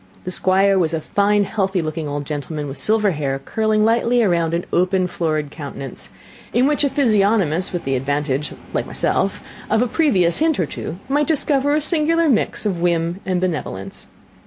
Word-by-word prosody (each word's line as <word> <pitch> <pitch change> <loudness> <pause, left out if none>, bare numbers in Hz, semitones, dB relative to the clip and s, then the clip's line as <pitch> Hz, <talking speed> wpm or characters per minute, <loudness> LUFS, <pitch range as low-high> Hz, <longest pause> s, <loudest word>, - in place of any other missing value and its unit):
The 185 - -4
Squire 190 +2 +3
was 165 -2 +1
a - - -1
fine, 205 +5 +2
healthy 195 -2 -1
looking 155 -1 -3
old 145 0 -4
gentleman, 150 +1 -4
with 135 0 -7
silver 215 +5 +2
hair 140 -4 -2
curling 215 +8 0
lightly 235 +1 +3
round 170 -4 +1
an 170 - -2
open, 185 +1 +2
florid 155 -4 -2
countenance; 135 - -7 0.4
in 245 +3 +3
which 295 +1 +2
a 285 - +3
physiognomist, 205 - +2
with 175 -3 -3
the 135 0 -1
advantage, 145 +2 -1 0.2
like - - -1
myself, - - -1 0.3
of 220 - +3
a - - 0
previous 220 - +2
hint 315 -1 +2
or 175 - +2
two, 160 +3 -6
might 290 +2 +1
discover 285 -2 +2
a 305 - +2
singular 330 +1 +2
mixture 220 -3 +1
of 175 -3 -3
whim 170 +1 0
and 185 -1 +1
benevolence. 150 - -4
185 Hz, 180 wpm, -20 LUFS, 155-225 Hz, 0.4 s, Squire